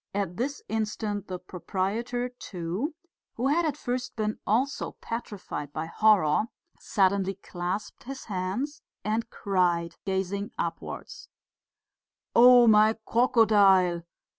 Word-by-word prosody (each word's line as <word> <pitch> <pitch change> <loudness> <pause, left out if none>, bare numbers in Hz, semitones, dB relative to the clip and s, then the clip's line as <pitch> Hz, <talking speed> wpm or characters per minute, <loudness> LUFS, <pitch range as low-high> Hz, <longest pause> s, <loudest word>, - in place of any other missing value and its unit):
At 195 -4 -1
this 275 +5 -3
instant 210 -2 -2
the 185 - -4
proprietor, 200 +7 -3
too, 210 - -4 0.4
who 255 +4 0
had 335 +4 +2
at 295 - -2
first 250 0 -3
been 215 -1 -2
also 255 +7 0
petrified 205 -10 -5
by 155 +2 -3
horror, 190 -2 +3 0.3
suddenly 195 0 +1
clasped 185 +3 -5
his 270 +1 -7
hands 205 +10 -3 0.2
and 220 +2 -1
cried, 175 -5 0
gazing 195 +1 -2
upwards: - - -5 1.1
"Oh 245 0 +8
my 215 0 +5
crocodile! 205 -7 +4
210 Hz, 110 wpm, -27 LUFS, 185-240 Hz, 1.1 s, Oh